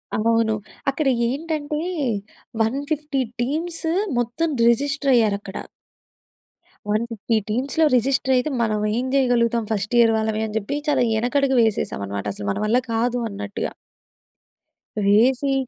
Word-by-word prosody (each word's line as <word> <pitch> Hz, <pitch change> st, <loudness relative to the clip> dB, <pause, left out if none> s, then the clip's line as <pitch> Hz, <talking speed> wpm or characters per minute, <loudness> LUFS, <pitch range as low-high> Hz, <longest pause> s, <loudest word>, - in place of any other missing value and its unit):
అవును. 225 Hz, 0 st, +2 dB, 0.4 s
అక్కడ 280 Hz, +1 st, -1 dB, 0.2 s
ఏంటంటే, 300 Hz, +1 st, -3 dB, 0.8 s
150 285 Hz, +4 st, -1 dB, 0.2 s
టీమ్స్ 325 Hz, +7 st, -2 dB, 0.3 s
మొత్తం 245 Hz, +8 st, -1 dB, 0.2 s
రిజిస్టర్ 280 Hz, +3 st, +2 dB
అయ్యారక్కడ. 205 Hz, -4 st, 0 dB, 1.3 s
150 230 Hz, +1 st, -1 dB
టీమ్స్‌లో 270 Hz, +8 st, +1 dB
రిజిస్టర్ 265 Hz, +2 st, +2 dB
అయితే, 250 Hz, +5 st, 0 dB
మనం 215 Hz, -2 st, +1 dB, 0.2 s
ఏం 250 Hz, -, -1 dB
జేయగలుగుతాం 235 Hz, -3 st, +2 dB
ఫస్ట్ 210 Hz, +2 st, -1 dB
ఇయర్ 230 Hz, -1 st, +5 dB
వాళ్ళమే? 220 Hz, 0 st, -1 dB
అని 215 Hz, -, -8 dB
జెప్పి 220 Hz, +7 st, -2 dB
చాలా 280 Hz, -, +3 dB
యెనకడుగు 265 Hz, +3 st, +1 dB
వేసేసాం 220 Hz, -, 0 dB
అన్నమాట. 100 Hz, 0 st, -5 dB
అసలు 100 Hz, 0 st, -6 dB
మన -, -, -3 dB
వల్ల 230 Hz, +4 st, +3 dB, 0.2 s
కాదు 245 Hz, +2 st, 0 dB
అన్నట్టుగా. 205 Hz, 0 st, -4 dB, 1.4 s
వేసి 255 Hz, +7 st, +3 dB
240 Hz, 115 wpm, -22 LUFS, 220-280 Hz, 1.4 s, ఇయర్